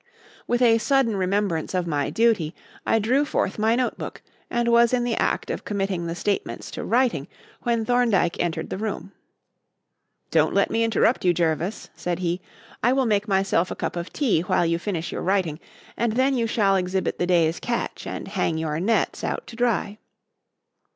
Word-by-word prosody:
With 240 +1 +2
a 230 -1 +5
sudden 270 -3 +2
remembrance 190 -3 0
of 180 -1 0
my 145 -4 -1
duty, 220 -9 +1 0.3
I - - +4
drew 245 +7 +2
forth 215 -8 -1
my 220 +2 +3
notebook, 250 0 -3 0.3
and 240 0 0
was 235 +1 +5
in 245 -1 +2
the 240 -1 0
act - - 0
of - - -4
committing 195 -4 -2
the 165 - -3
statements 200 +2 -2
to - - -5
writing, 230 - +1 0.3
when 235 -2 0
Thorndyke 230 -8 +2
entered 165 -2 -2
the - - -3
room. 200 -3 -4 1.2
"Don't - - +3
let - - +3
me 230 - +2
interrupt 230 +2 +2
you, 175 -1 +3
Jervis," 170 +4 -1
said 175 -1 -2
he. 175 0 -2 0.4
"I 245 +3 +3
will 265 -1 +2
make 210 -2 +1
myself 190 -3 +1
a - - -4
cup - - -3
of 175 0 -5
tea 245 - +1
while 180 0 +1
you 170 0 +1
finish 175 -3 -3
your - - -4
writing, 180 -5 0 0.4
and 230 -1 0
then 260 +3 +2
you 235 -2 +1
shall 200 -4 +2
exhibit 185 +1 -1
the 175 - +1
day's 170 -2 +2
catch 235 -1 -3
and - - -5
hang 180 -5 -1
your 160 -1 -2
nets 220 +6 0
out - - -2
to 230 - -11
dry." 225 -3 0
200 Hz, 185 wpm, -24 LUFS, 175-235 Hz, 1.2 s, a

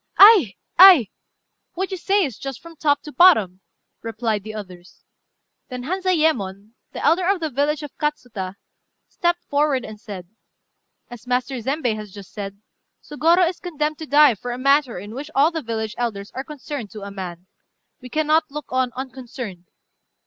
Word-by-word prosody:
"Ay! 390 - +8 0.2
ay! 355 - +9 0.6
what 380 +2 -3
you 380 - -3
say 390 +2 +2
is 255 -7 -7
just 270 -3 -6
from 335 0 -13
top 290 -2 +1
to 300 - -9
bottom," 220 - +5 0.4
replied 225 -1 -2
the 215 +2 -8
others. 185 -4 -11 0.7
Then 250 -1 -6
Hanzayémon, 305 - 0 0.2
the - - -5
elder 355 +2 +3
of 395 -2 +2
the 320 -2 -3
village 290 +3 0
of 295 - -9
Katsuta, 245 -11 -3 0.5
stepped 345 0 -1
forward 285 -4 0
and 215 -1 -10
said 185 -4 -8 0.8
"As 240 0 -11
Master 250 0 -1
Zembei 265 -1 -1
has 210 -2 -8
just 200 -1 -12
said, 200 0 -7 0.4
Sôgorô 335 +4 +3
is 350 - -4
condemned 305 -3 -3
to 315 - -7
die 290 -2 +6
for 245 +4 -6
a 240 - -4
matter 275 -2 +2
in 205 +4 -8
which 285 +5 -7
all 285 +5 +4
the 325 -1 -3
village 220 -3 -4
elders 210 -4 -3
are 265 - -4
concerned 285 -6 -7
to 210 -2 -8
a 200 - -7
man. 180 -3 -7 0.6
We 250 - -10
cannot 310 +3 +1
look 295 +1 -8
on 255 -1 +1
unconcerned. 250 -7 -7
265 Hz, 170 wpm, -22 LUFS, 215-310 Hz, 0.8 s, ay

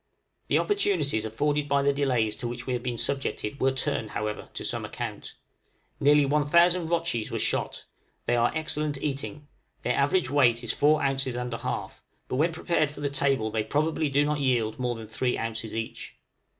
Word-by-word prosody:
The - - +3
opportunities 165 - +1
afforded 145 +6 0
by 140 0 +3
the 140 0 +3
delays 125 -6 +1
to 125 - -4
which 120 0 -6
we 130 - -1
have 120 - -1
been 120 -1 -3
subjected 140 -2 -2
were 135 - +3
turned, 130 -4 -1
however, 105 0 -4
to - - -4
some - - -1
account. - - -6 0.6
Nearly 145 0 +5
one 145 +2 +2
thousand 170 +3 +4
rotchies 165 -10 0
were - - -2
shot; - - -1 0.4
they 120 - +2
are 120 0 +3
excellent 155 -2 -1
eating; 145 +1 -4 0.4
their 125 - +1
average 145 +1 +2
weight 120 -5 +4
is 115 - 0
four 150 +1 +3
ounces 135 -2 0
and 125 -1 -3
a 115 - -3
half, - - -4 0.3
but 130 - -2
when 160 +4 +3
prepared 160 -2 +1
for 145 0 -10
the 145 -1 -1
table 135 -5 +1
they 110 0 0
probably 155 +5 0
do 140 +1 +3
not 150 0 0
yield 120 -5 +1
more 125 -1 -1
than 115 -1 -8
three 115 +4 -1
ounces 115 -1 -3
each. 115 0 -5
140 Hz, 190 wpm, -27 LUFS, 120-150 Hz, 0.6 s, Nearly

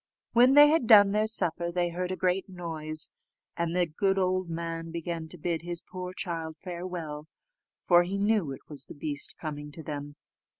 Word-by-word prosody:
When 250 +3 +6
they 290 0 +10
had 310 -6 +2
done 205 -3 +8
their 215 +1 +1
supper, 170 -5 +1
they 175 0 0
heard 180 +2 -3
a - - -1
great 185 +2 0
noise, 160 -4 -1 0.4
and 170 0 -2
the 180 -1 +3
good 195 +5 0
old 185 -1 0
man 165 0 -4
began 165 -1 -4
to 180 - -9
bid 165 0 -2
his 175 0 -3
poor 180 +1 -7
child 165 -3 -5
farewell, 170 -4 -6 0.6
for 175 -1 +7
he 185 +3 -2
knew 200 -6 +1
it 135 - -10
was 140 -3 -9
the - - -11
beast 145 -1 -3
coming 150 -2 -6
to 160 - -8
them. 145 -1 -6
175 Hz, 185 wpm, -28 LUFS, 160-185 Hz, 0.6 s, they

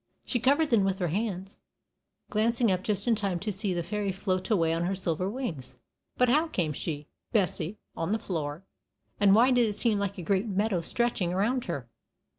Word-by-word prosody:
She 245 - 0
covered 285 +5 +3
them 220 -4 +5
with 195 -1 +1
her 180 -3 -1
hands, 195 +1 -3 0.7
glancing 230 +1 +2
up 185 0 0
just 205 +1 -1
in 235 - +5
time 200 -4 -1
to 210 - -1
see 200 0 -1
the 175 -1 -1
fairy 205 +2 -2
float 185 0 -2
away 165 -7 +3
on 165 +1 0
her 190 +2 0
silver 180 0 -1
wings. 170 - -5 0.4
But 250 - +4
how 300 +7 +3
came 170 - -1
she, 150 0 -4 0.2
Bessie, 200 -2 0 0.2
on 165 - -2
the 220 - +2
floor, 160 -5 -4 0.6
and 200 -1 +6
why 245 +4 +6
did 245 -2 +4
it 210 - -3
seem 220 -4 +2
like 200 0 -2
a 180 - -5
great 195 +5 +1
meadow 200 -2 0
stretching 205 -2 0
around 230 +7 0
her? 140 -8 -4
195 Hz, 200 wpm, -28 LUFS, 175-225 Hz, 0.7 s, and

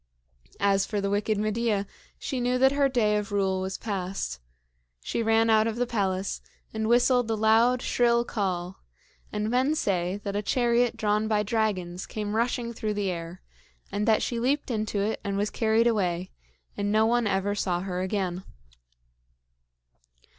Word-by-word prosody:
As 195 -1 +3
for 210 0 -2
the 200 0 -1
wicked 210 +1 0
Medea, 215 -1 0 0.3
she 265 - -4
knew 250 +1 +1
that 265 +1 +5
her 280 -1 +2
day 215 -5 +2
of 210 +1 -4
rule 190 -2 +1
was 190 +1 -3
past. 190 - -4 0.6
She - - -2
ran 225 0 +3
out 220 0 +4
of 225 - -2
the 245 +1 0
palace, 195 -5 -2 0.3
and 220 0 -2
whistled 245 0 +3
a 225 - +1
loud, 225 +3 +3
shrill 235 -1 +2
call; 185 -5 -3 0.5
and 210 0 -2
men 260 +5 +2
say 185 - -1
that 200 -1 -3
a 205 - 0
chariot 240 +2 +1
drawn 210 0 +1
by 210 -1 +1
dragons 195 -5 -1
came 210 -1 -4
rushing 235 +1 -1
through 215 -2 -3
the 200 -2 -1
air, 170 +1 -7 0.5
and 205 +2 -1
that 220 -1 +3
she 235 - -2
leaped 270 +3 0
into 215 -2 -1
it 215 +2 -1
and 200 -1 -2
was 205 +1 -1
carried 225 0 +2
away, 185 -5 0 0.4
and 205 0 -1
no 215 +1 +4
one 235 0 +2
ever 195 +1 0
saw 180 -4 -1
her 185 -1 -3
again. 185 -2 -2
210 Hz, 170 wpm, -27 LUFS, 195-235 Hz, 0.6 s, that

